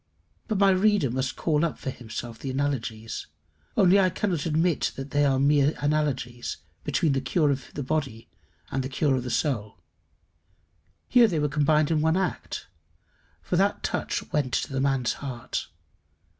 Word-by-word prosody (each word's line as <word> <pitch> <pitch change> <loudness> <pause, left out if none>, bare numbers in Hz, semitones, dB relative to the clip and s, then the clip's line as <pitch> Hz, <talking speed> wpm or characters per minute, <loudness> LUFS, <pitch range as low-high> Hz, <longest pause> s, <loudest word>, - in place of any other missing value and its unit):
But 215 - 0
my 195 0 +5
reader 195 - +3
must 130 +1 -2
call 155 -1 +1
up 165 - -1
for 130 - -4
himself 120 -1 -7
the 135 - -5
analogies 125 -5 -3 0.5
only 190 +1 +6
I 185 -1 +4
cannot 180 -4 -1
admit 165 +1 +1
that 135 +1 -7
they 145 0 +3
are 135 -2 +3
mere 145 +1 +3
analogies 140 -5 -1 0.3
between 145 +2 +1
the 135 -1 +1
cure 150 -2 +2
of 135 -2 -2
the 145 - -3
body 135 -5 -2 0.4
and 135 - 0
the 130 - -4
cure 140 +1 +1
of 130 - -1
the 125 - -5
soul: 115 -6 -1 1.3
here 245 -2 +6
they 175 -6 -1
were 150 -1 +2
combined 150 +1 +2
in 155 -2 +2
one 160 +3 +2
act, 190 -3 -3 0.8
for - - -1
that - - +1
touch - - -2
went 140 -4 0
to - - -2
the 135 - 0
man's 135 -3 +1
heart. 125 -4 -4
145 Hz, 170 wpm, -26 LUFS, 130-160 Hz, 1.3 s, only